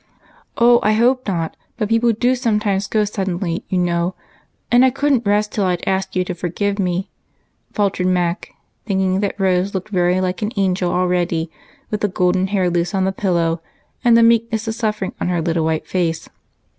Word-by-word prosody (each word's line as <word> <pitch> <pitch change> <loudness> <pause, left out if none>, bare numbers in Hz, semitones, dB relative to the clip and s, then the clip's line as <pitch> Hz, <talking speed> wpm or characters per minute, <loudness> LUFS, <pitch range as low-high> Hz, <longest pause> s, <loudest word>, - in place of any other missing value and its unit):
Oh, 240 0 +6
I 215 - +2
hope 250 +3 +2
not; 165 -4 -2 0.2
but 215 -3 -1
people 230 +1 +3
do 245 +3 +1
sometimes 210 -5 0
go 215 -1 +1
suddenly, 190 -2 -3
you 185 - 0
know, 175 0 0 0.6
and 245 +1 +6
I 260 - +6
couldn't 270 -3 0
rest 210 +1 +2
till 205 - 0
I'd 180 -2 -1
asked 190 0 -1
you 185 - +2
to 180 - -3
forgive 200 +4 -2
me," 185 +1 -1 0.6
faltered 195 -3 0
Mac, 180 0 0 0.4
thinking 190 -2 +1
that 200 0 -2
Rose 190 +1 +1
looked 190 +3 -4
very 180 -2 +2
like 185 +1 -2
an 210 +2 -2
angel 185 -2 +1
already, 175 -2 0 0.4
with 210 - -2
the 210 - +2
golden 185 0 +1
hair 190 -2 +1
loose 175 +2 -1
on 190 -1 +1
the 190 - +1
pillow, 170 -4 0 0.4
and 235 -2 +5
the 230 - +5
meek 230 0 +3
ness 220 0 -2
of 220 - -1
suffering 215 -4 -2
on - - 0
her 175 -1 0
little 165 -1 0
white 160 -1 -1
face. 170 -3 -2
190 Hz, 190 wpm, -19 LUFS, 180-215 Hz, 0.6 s, Oh